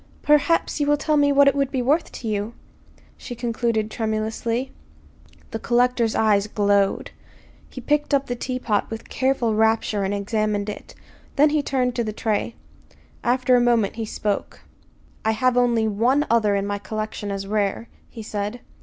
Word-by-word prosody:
"Perhaps 300 +2 +2
you 290 - +1
will 295 0 +3
tell 305 +1 0
me 285 -1 +4
what 280 0 +5
it 275 - +5
would 275 -2 0
be 260 -3 -1
worth 295 +7 +1
to 235 - -7
you," 210 +2 -2 0.6
she 245 - -8
concluded 230 -2 -1
tremulously. 225 +3 -2 0.8
The 225 - -4
collector's 240 -1 +1
eyes 210 -2 +3
glowed. 200 -1 +1 0.6
He 255 - -9
picked 295 +4 0
up 280 -1 +2
the 245 - -3
teapot 245 -4 -2
with 225 0 -7
careful 260 -4 0
rapture 220 -1 +1
and 195 - -1
examined 205 0 -1
it. 210 - -9 0.4
Then 295 +1 +4
he 305 -1 +2
turned 255 -3 0
to 235 - +1
the 215 -1 -4
tray. 220 +1 -2 0.7
After 250 +1 +3
a 245 - +4
moment 235 -3 +2
he 225 - -2
spoke. 210 -1 -3 0.6
"I 220 - +2
have 255 +2 +1
only 240 -3 +2
one 245 +8 +2
other 215 -3 +3
in 200 0 -1
my 205 0 -3
collection 215 +1 -5
as 195 0 -4
rare," 205 +2 -1 0.2
he 225 - -9
said. 210 +2 -4
230 Hz, 170 wpm, -23 LUFS, 215-255 Hz, 0.8 s, what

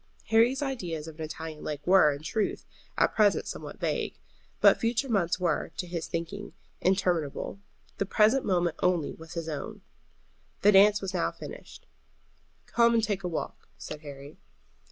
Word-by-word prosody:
Harry's 235 +5 +4
ideas 175 - -4
of 160 0 -10
an 160 - -3
Italian 155 0 -7
lake 145 -1 -5
were, 180 -5 +6
in 145 +1 -6
truth, 205 +6 -2 0.3
at - - +3
present 210 -2 +3
somewhat - - -7
vague. - - -2 0.4
But - - +6
future 230 +4 0
months 190 -7 +1
were, 170 -5 0
to 180 - -2
his 170 -2 -4
thinking, 200 +5 -5 0.3
interminable; 180 -2 0 0.4
the 200 - 0
present 220 +7 +4
moment 175 -3 +1
only 175 -5 +1
was 160 +1 -11
his 165 -1 -4
own. 150 -3 -5 0.8
The 205 - +7
dance 205 +1 +6
was 195 -1 -3
now 175 - +1
finished. - - -11 0.8
"Come 235 0 +3
and 225 - +3
take 200 -3 -1
a - - -1
walk," 165 - -5
said 155 - -7
Harry. 140 -1 -10
180 Hz, 160 wpm, -28 LUFS, 160-210 Hz, 0.8 s, The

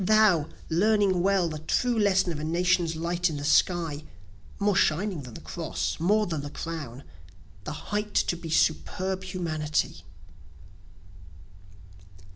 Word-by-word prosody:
thou, 200 -6 +4 0.2
learning 195 +1 +2
well, 190 -1 +2
The 155 -2 -5
true 240 +10 0
lesson 190 -3 +3
of 155 - -4
a - - -5
nation's 170 +1 +1
light 170 +2 0
in 155 - -4
the 145 - -5
sky, 160 -1 +2 0.5
(More 205 -1 +1
shining 180 +1 +1
than 125 -4 -10
the - - -9
Cross, 75 0 -3
more 210 +6 +3
than 160 -6 -3
the 145 - -6
Crown,) 145 -6 -6 0.6
The - - -4 0.2
height 210 0 -2
to - - +2
be 170 -1 -8
superb 185 +4 0
humanity. 160 -5 -2
175 Hz, 135 wpm, -27 LUFS, 155-190 Hz, 0.6 s, thou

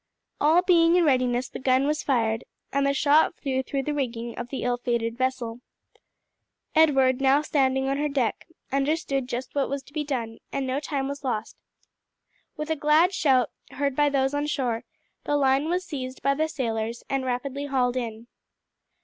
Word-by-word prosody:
All 320 +4 +4
being 340 -2 +5
in 355 - +4
readiness 255 -3 +2
the - - -8
gun 260 +1 +2
was 300 +1 0
fired, 225 -4 0 0.3
and 280 0 +2
the - - +3
shot 295 +4 +4
flew 265 -2 -1
through 270 +1 -3
the 300 - -2
rigging 235 -4 -3
of 240 0 -6
the 270 - -4
ill 245 0 +1
fated 235 -1 -1
vessel. 250 -2 -2 1.1
Edward, 270 -5 +4
now 275 +2 +4
standing 265 -3 +1
on 275 +1 0
her 295 +1 0
deck, 260 -6 -1 0.2
understood 275 -2 0
just 250 +1 -4
what 280 -2 0
was 280 0 -3
to 285 - -19
be 305 -1 -1
done, 235 -6 -4
and 275 - -2
no 260 +2 -1
time 280 -2 -2
was 280 +1 -6
lost. 240 -5 -3 1.0
With 305 +1 -3
a - - +2
glad 310 +5 +4
shout, 260 - +2 0.2
heard 280 -1 -1
by 290 +1 +3
those 270 -1 +1
on 290 +1 -1
shore, 245 -6 -1 0.4
the 290 - +1
line 275 +2 +2
was 360 +1 -1
seized 260 -5 -6
by 275 +1 +3
the 310 +3 0
sailors 230 -5 -3
and 270 -1 -1
rapidly 270 +3 -3
hauled 255 -3 +1
in. 230 -2 -4
270 Hz, 185 wpm, -26 LUFS, 250-290 Hz, 1.1 s, being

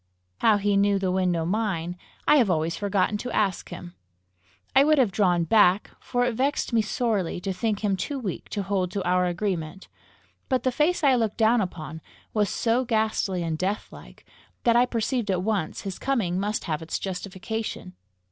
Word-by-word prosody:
How 220 -2 +4
he 205 0 +1
knew 200 0 +3
the 190 -1 0
window 180 -3 +1
mine, 180 -3 -1 0.3
I 300 - +6
have 240 -7 +4
always 165 -1 0
forgotten 200 0 0
to 250 - -5
ask 195 -5 0
him. 175 0 -9 0.8
I 270 - +7
would 305 +1 +4
have 245 -7 +3
drawn 180 -4 +2
back, 190 +2 +4
for 245 0 0
it 245 - 0
vexed 265 +1 -1
me 230 - +4
sorely 215 - -1
to 190 +2 -3
think 215 +1 -2
him 200 -2 +2
too 275 +9 -3
weak 210 -9 -5
to 205 - -2
hold 190 -2 -1
to 200 - -2
our 180 0 +2
agreement, 175 -1 -3 0.6
but 255 -3 +1
the 255 - +2
face 310 +6 +1
I 275 -2 +5
looked 225 -4 0
down 225 +1 +4
upon 160 -4 -5 0.3
was 210 -2 +1
so 235 +3 +1
ghastly 215 -6 0
and 160 -1 -2
deathlike, 195 +3 -5 0.4
that 235 -1 +4
I 245 +1 +5
perceived 235 -1 -1
at 185 -2 0
once 205 -6 -1
his 195 -2 -6
coming 210 -10 0
must 210 +2 -1
have 155 -2 -2
its 160 - -3
justification. 190 - -5
200 Hz, 185 wpm, -25 LUFS, 180-230 Hz, 0.8 s, I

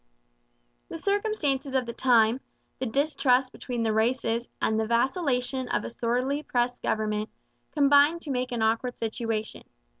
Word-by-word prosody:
The - - -5
circumstances 330 -9 -1
of 260 -2 +2
the 235 - -5
time, 235 -1 +3 0.4
the 260 - -2
distrust 270 0 +2
between 240 -3 -4
the 220 -1 +1
races 230 +1 0
and 220 0 +1
the 220 - -1
vacillation 255 +1 0
of - - 0
a - - -6
sorely 250 +5 -1
pressed 245 -3 -1
government, 215 0 -1 0.4
combined 290 +3 +4
to 290 - -4
make 250 0 -2
an 235 -2 -1
awkward 230 +3 0
situation. 225 -1 -3
250 Hz, 145 wpm, -27 LUFS, 230-275 Hz, 0.4 s, combined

